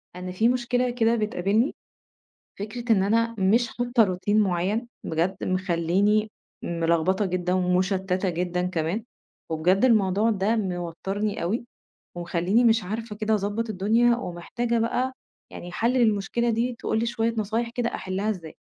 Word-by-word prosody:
أنا 180 0 -6
في 220 +6 +2
مشكلة 250 0 +1
كده 235 -1 +2
بتقابلني، 215 +3 0 0.8
فكرة 230 +4 -2
إن 195 -3 +4
أنا 230 +3 +1
مش 225 +5 +3
حاطة 245 0 +2
روتين 200 +3 +1
معين 200 +4 0 0.2
بجد 170 +4 -1
مخليني 185 +4 +1 0.3
ملخبطة 170 +4 +1
جدًا، 180 -1 -1
ومشتتة 185 +1 +1
جدًا 180 +1 -1
كمان، 180 +4 -2 0.5
وبجد 180 +7 +2
الموضوع 215 -2 +3
ده 210 +2 +1
موترني 195 +1 -3
اوي، 220 +8 -2 0.5
ومخليني 175 +6 +1
مش 225 -2 +4
عارفة 215 +3 -5
كده 215 +1 0
أضّبط 210 +2 -2
الدنيا، 225 +5 +3
ومحتاجة 235 +4 -3
بقى 250 +3 0 0.4
يعني 175 - -9
حل 235 +6 +1
للمشكلة 235 -1 +1
دي، 235 +2 -1
تقول 220 - -1
لي 230 - 0
شوية 230 -1 -1
نصايح 220 +3 -1
كده 240 0 -2
أحلها 195 +3 -2
إزاي. 170 -7 -6
205 Hz, 140 wpm, -25 LUFS, 180-230 Hz, 0.8 s, إن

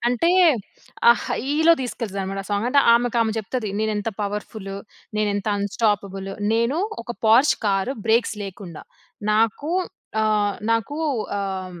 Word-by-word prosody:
అంటే 250 +8 +2 0.8
ఆ - - +11 0.2
హైలో 300 +6 +2
తీసుకెళ్తాది 230 -5 -4
అన్నమాట 195 +1 -4
ఆ - - -12
సాంగ్. 205 +3 0
అంటే 280 +3 +3 0.2
ఆమెకు 240 0 +1
ఆమె 225 -1 +1
చెప్తది 220 +1 -3
నేనెంత 215 0 -1
పవర్ఫులు, 205 -1 -5 0.4
నేనెంత 205 -1 -1
అన్స్టాపబులు, 200 -2 -1 0.2
నేను 235 +7 +1 0.2
ఒక 240 +1 -5
'పోర్ష్' 235 +7 +5
కార్ 195 +3 +1 0.2
బ్రేక్స్ 225 0 +2
లేకుండా 185 -4 -9 0.5
నాకు 225 +8 +1 0.5
ఆహ్, 210 -2 +1
నాకు 230 +6 0 0.4
ఆహ్, 190 -3 -5
215 Hz, 125 wpm, -23 LUFS, 200-235 Hz, 0.8 s, ఆ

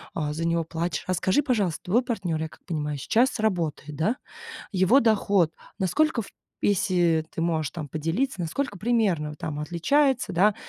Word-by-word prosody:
а, 150 -2 -1
за 165 +2 -2
него 170 0 +1
плачешь. 165 +1 -3
А 185 - +1
скажи, 190 - +2
пожалуйста, 210 - 0
твой 215 +8 +2
партнер, 190 -10 -2
я 160 - -3
как - - -19
понимаю, 150 -4 -2
сейчас 240 - +2
работает, 165 -8 -1
да? 165 - +1 0.6
Его 190 +8 +5
доход- 200 - +3 0.3
насколько, 240 - +2
в - - -11 0.4
если 175 -5 +2
ты 165 - -3
можешь 160 -4 0
там 155 -1 -6
поделиться, 165 - -2
насколько 200 - -2
примерно 205 -8 +1
он 150 - -7
там 150 0 -4
отличается, 220 - +1
да? 195 +4 +4
180 Hz, 170 wpm, -26 LUFS, 160-220 Hz, 0.6 s, Его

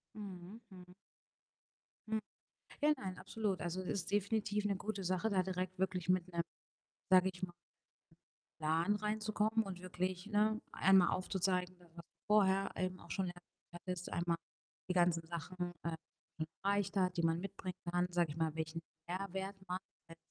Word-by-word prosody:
Mhm, 200 +1 -7
mhm. 180 -1 -12 1.2
Hm. 220 0 +2 0.6
Ja, 300 0 +6
nein, 190 -6 -5
absolut. 210 -4 -1
Also 175 +2 -2
es 185 - -6
ist 185 -2 -1
definitiv 205 +1 +1
'ne 200 -1 +2
gute 200 0 -3
Sache, 185 +4 +1
da 190 -2 +4
direkt 185 0 -2
wirklich 185 -2 0
mit 185 -1 +3
'nem 170 0 +1 0.7
sage 185 0 +7
ich 180 +1 -13
mal 180 - -2 1.1
Plan 165 +6 +3
reinzukommen 215 +1 +1
und 185 -2 -6
wirklich, 185 0 -2
ne, 215 +1 +3
einmal 190 -2 +6
aufzuzeigen, 185 -1 +1
was 175 -1 -19 0.4
vorher 195 -2 +4
eben 185 0 -1
auch 170 - -11
schon 190 - +1
erwähnt 175 0 -11
hattest. 180 0 -4
Einmal 170 0 +1 0.5
die - - +3
ganzen 175 -1 +4
Sachen, 175 +1 -4
äh, 170 - 0
die 160 0 -8
man - - -6 0.2
erreicht 200 0 +2
hat, 180 -2 +2
die - - +3
man 165 0 +3
mitbringen 185 -1 -5
kann, 175 0 +2
sage 175 -3 +2
ich 150 - -7
mal, 160 -1 +1
welchen 160 +1 -2 0.3
Mehrwert 190 +2 -3
man 180 0 0 0.3
als 165 0 -12
185 Hz, 165 wpm, -37 LUFS, 175-200 Hz, 1.2 s, sage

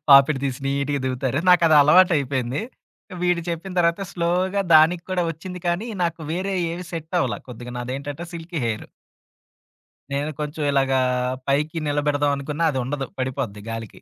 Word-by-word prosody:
పాపిడి 140 +1 +7
తీసి 135 0 -2
నీట్‌గా 140 +1 0
దువ్వుతారు. 130 +2 -1
నాకదలవాటైపోయింది. 150 - +4 0.6
వీడు 180 -1 +2
చెప్పిన 170 +3 -5
తర్వాత, 170 +2 +2
స్లోగా 180 +3 0
దానికి 165 +3 +6
కూడా 180 -1 +1
ఒచ్చింది 180 +3 -8
కానీ, 180 +7 -1 0.2
నాకు 170 -1 -1
వేరే 190 +2 -2 0.2
ఏవి 175 0 -6
సెట్టవల, 165 +2 -1
కొద్దిగా 120 0 -8
నాదేంటంటే, 140 +6 -5
సిల్కీ 165 -2 -5
హెయిర్. 110 -1 -3 1.3
నేను 145 +2 -1
కొంచెం 150 +1 -3
ఇలాగా, 135 -1 +2 0.5
పైకి 150 +4 0
నిలబెడదాం 145 0 +1
అనుకున్నా, 150 +4 -3
అదుండదు 135 +1 -2
పడిపోద్ది 130 -6 -3
గాలికి. 115 -1 -7
150 Hz, 130 wpm, -23 LUFS, 135-170 Hz, 1.3 s, పాపిడి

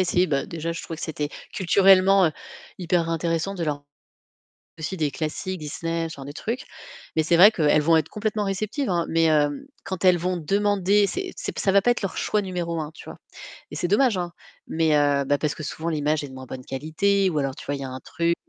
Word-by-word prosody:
essayé, 180 0 +2
bah, 140 -2 0
déjà 165 0 -4
je 165 - -6
trouvais 165 - -6
que - - -9
c'était 150 -2 -3 0.2
culturellement, 190 0 +5
heu, 155 - 0 0.5
hyper 175 -2 0
intéressant 165 +3 -1
de 175 - -4
leur 145 -1 -3 1.0
aussi 160 +5 -4
des 150 -4 0
classiques, 175 +4 -4
Disney, 165 +2 -3
ce - - -8
genre 135 - -9
de 145 - -7
trucs. 230 - -4 0.5
Mais 160 - +3
c'est 170 - +3
vrai 200 +5 +9
qu'elles 150 -5 +3
vont 165 +2 +4
être 160 0 -1
complètement 215 0 -2
réceptives, 210 +6 -2
hein, 170 -2 +1
mais, 165 0 +2
hem, 150 - +2 0.2
quand 190 -1 -5
elles 180 -1 +6
vont 180 +1 -1
demander, 200 +3 +2
c'est 375 - -4
c'est, - - -6
ça 195 - +2
va 200 0 +5
pas 245 - +3
être 240 - -1
leur 195 - -3
choix 210 - 0
numéro 175 -4 -3
1, 150 - -6
tu - - -13
vois. - - -9 0.5
Et - - -6
c'est 175 - -1
dommage, 210 +1 +3
hein, 175 -1 -3 0.4
mais, 160 -2 +2
heu, 145 -1 +2
bah, 145 +1 +2
parce 150 -1 0
que - - -7
souvent 160 +3 -4
l'image 150 -1 0
est 140 - -6
de - - -12
moins 130 0 -9
bonne 130 0 -8
qualité 185 +8 +1
ou 155 - -3
alors 135 -1 -2
tu - - -11
vois, 145 - -2
il 140 - -6
y - - -4
a 130 - -5
un 130 0 -7
truc, 170 +4 -1
170 Hz, 235 wpm, -24 LUFS, 150-195 Hz, 1.0 s, vrai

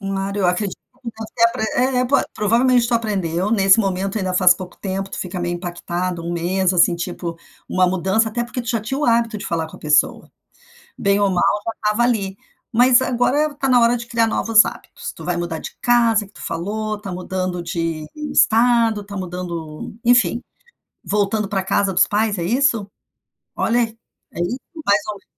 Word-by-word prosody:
Um 195 -1 -4
lado 195 +1 -3
eu 190 - +2
acredito 180 +2 -1 0.3
que 235 - -5
deve 220 0 -9
ter 230 - +3
apr 230 -1 +1 0.3
é - - +3
é 250 - +2
prov 260 - +2
provavelmente 235 +3 +3
tu 245 - +1
aprendeu 195 -5 -1
nesse 195 -2 +5
momento, 195 +1 -1
ainda 185 -2 -2
faz 180 -1 +6
pouco 180 -1 -10
tempo. 195 0 -4
Tu - - -6
fica 180 0 -4
meio 175 0 -2
impactado 175 0 -4
um 170 +1 -4
mês 180 +2 0
assim, 175 0 +4
tipo 170 -1 -5 0.3
uma 185 0 +2
mudança, 190 +5 +1
até 235 +2 -2
porque 245 +1 -5
tu 235 - -9
já 230 -3 0
tinha 265 +6 -4
o 300 - 0
hábito 230 -2 +2
de - - -6
falar 165 -1 -2
com - - -12
a - - -17
pessoa, 150 0 +1 0.7
bem 200 0 +2
ou 200 -1 +3
mal, 180 - +1 0.2
já 225 - -1
estava 210 +2 0
ali, 200 -5 0 0.3
mas 245 +2 +5
agora 260 +5 +1
está 280 -2 -2
na 250 -1 +5
hora 235 +1 +3
de 235 0 -8
criar 230 -1 +1
novos 225 -1 +4
hábitos. - - -7
Tu - - -12
vai 180 -1 -1
mudar 170 -2 -3
de - - -9
casa 230 -3 +3
que 200 - -24
tu - - -13
falou, 215 +4 -3
tá 200 -3 -7
mudando 185 0 -3
de 165 -2 -3
estado, 235 -6 +3
está 200 0 -9
mudando, 175 -4 -6
enfim, 240 0 +3 0.6
voltando 205 0 0
para 195 -2 -1
casa 195 +1 +1
dos - - +4
pais. 210 -1 0
É 170 - -2
isso? 230 -1 +1 0.7
Olha, 240 +2 +1
é 225 -6 -6
isso 240 +10 -2 0.2
ou 315 - -7
mais 200 +1 +3
ou 210 - -2
menos. 195 - -16
205 Hz, 205 wpm, -20 LUFS, 180-230 Hz, 0.7 s, faz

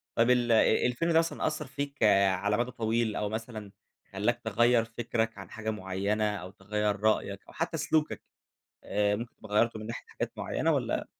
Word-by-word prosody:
طب 115 +1 +3
ال 120 -1 +3
آآ 110 -1 +4
الفيلم 125 +8 0
ده 165 - +6
مثلًا 165 -1 -1
أثّر 150 -1 -2
فيك 140 0 -4 0.3
على 105 +3 0
مَدى 120 +1 -1
طويل 115 -1 0
أو 105 - -1
مثلًا 110 -2 -6 0.4
خلّاك 115 +5 0
تغيّر 115 +2 +3
فِكرَك 115 -1 -2
عن 95 - -9
حاجة 110 -1 -5
معيّنة 100 +1 -1
أو 90 -2 -7
تغيّر 105 +1 -1
رأيك 105 -2 +1
أو - - -14
حتّى 165 +1 -2
سلوكك 155 +1 0 0.6
آآ 105 0 +1
ممكن 120 +2 -7
تبقى 105 -1 -9
غيّرته 115 +1 +3
من 110 - -7
ناحية 115 - -6
حاجات - - -4
معيّنة - - 0
والّا - - -1
110 Hz, 180 wpm, -29 LUFS, 105-120 Hz, 0.6 s, ده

